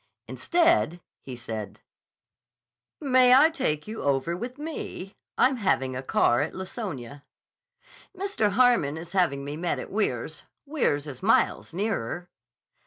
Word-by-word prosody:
Instead 175 - +2 0.2
he 130 - -8
said: 110 -3 -6 1.2
"May 255 -3 +5
I 305 +5 +6
take 150 - -2
you 220 +1 -6
over 140 +4 0
with 240 +7 -6
me? 295 - -6 0.2
I'm 255 +1 +3
having 135 - 0
a 130 - -3
car 120 -1 +2
at 150 - -3
Laconia." 170 - -6 0.9
"Mr. 370 - 0
Harmon 235 - +3
is 170 +1 -9
having 150 -8 +1
me 145 +1 -5
met 175 +1 -1
at - - -7
Weirs. 210 +1 -2 0.2
Weirs 270 - 0
is 145 0 -8
miles 215 -3 +2
nearer." 175 - -3
180 Hz, 130 wpm, -26 LUFS, -, 1.2 s, I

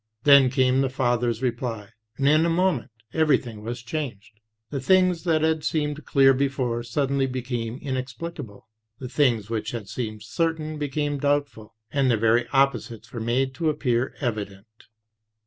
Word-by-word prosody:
Then 140 -2 +7
came 130 0 +2
the 135 - +1
father's 120 -2 0
reply, 115 -4 -3 0.3
and 140 - +1
in 155 +2 +5
a 170 - +2
moment 175 -6 +1 0.2
everything 135 -9 +1
was 120 +2 -6
changed. 120 -6 -6 0.3
The 140 - -2
things 185 +2 +3
that 160 -2 +2
had 160 -1 +1
seemed 150 -1 -2
clear 135 -1 +5
before, 130 -3 -1
suddenly 135 +3 0
became 120 -2 -4
inexplicable; 130 -3 -6 0.3
the 130 - -6
things 120 -7 +1
that 110 -2 -2
had 110 -4 -6
seemed 110 -2 -5
certain 155 +5 -2
became 145 0 -2
doubtful, 140 -7 -1 0.2
and 135 -2 +2
their 115 - +3
very 115 +2 +2
opposites 125 -4 0
were 120 - -4
made 125 +4 0
to 155 +4 0
appear 130 -4 0
evident. 110 -3 -5
130 Hz, 150 wpm, -25 LUFS, 115-145 Hz, 0.3 s, Then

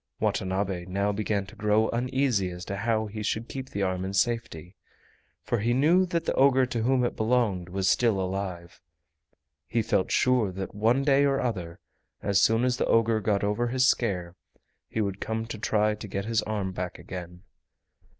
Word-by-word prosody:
Watanabe 95 -1 -1
now 100 +2 0
began 100 -1 -1
to 100 - -14
grow 105 +1 +2
uneasy 125 -5 0
as 90 0 -8
to 100 - -4
how 110 +2 0
he 105 0 -6
should 110 +2 -2
keep 130 -1 -6
the 100 - -2
arm 95 -1 -1
in 95 +1 -4
safety, 100 -7 -1 0.7
for 120 - -1
he 120 +3 +1
knew 170 +8 +4
that 170 -1 -1
the - - 0
ogre 130 -1 +4
to 120 -2 -3
whom 125 +1 +2
it - - -2
belonged 110 -6 0
was 95 +1 -1
still 115 -3 +3
alive. 95 -2 -4 0.9
He 115 -1 0
felt 95 - +1
sure 125 -6 +2
that 95 +1 -5
one 115 +6 +2
day 140 0 +4
or 135 -1 +2
other, 90 -9 -3 0.4
as 100 -1 +2
soon 115 +3 +3
as 125 -1 +1
the - - 0
ogre 115 -1 +3
got 100 -1 0
over 105 +4 0
his 130 +1 +2
scare, 90 -9 0 0.5
he 110 - -1
would 100 -1 -3
come 110 0 -2
to 115 -2 -7
try 105 -1 +1
to 105 0 -8
get 100 0 -4
his 115 0 +1
arm 105 -3 -3
back 90 -1 -5
again. 90 -1 -9
105 Hz, 190 wpm, -27 LUFS, 95-120 Hz, 0.9 s, knew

